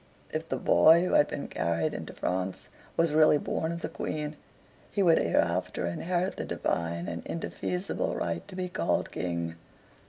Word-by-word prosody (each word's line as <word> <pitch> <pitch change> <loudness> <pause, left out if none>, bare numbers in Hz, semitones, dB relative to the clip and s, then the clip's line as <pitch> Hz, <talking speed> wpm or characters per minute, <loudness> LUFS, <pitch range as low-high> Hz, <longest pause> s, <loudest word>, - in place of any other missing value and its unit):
If 160 +1 -3
the - - 0
boy 165 +3 +6
who - - -1
had 145 - +6
been 140 - -4
carried 85 -2 0
into - - -6
France 95 +1 -3 0.3
was 165 -2 +3
really 155 -1 +6
born 160 +2 -2
of 170 0 -5
the - - -2
Queen, 150 0 -3 0.5
he 200 - +1
would 165 -3 +6
hereafter 85 +1 +1
inherit 175 - -1
the - - -2
divine 85 +1 -2
and 85 0 -4
indefeasible 180 +2 -3
right 85 0 -2
to - - -10
be 185 0 -2
called 180 - 0
King. 85 -2 -3
150 Hz, 165 wpm, -29 LUFS, -, 0.5 s, boy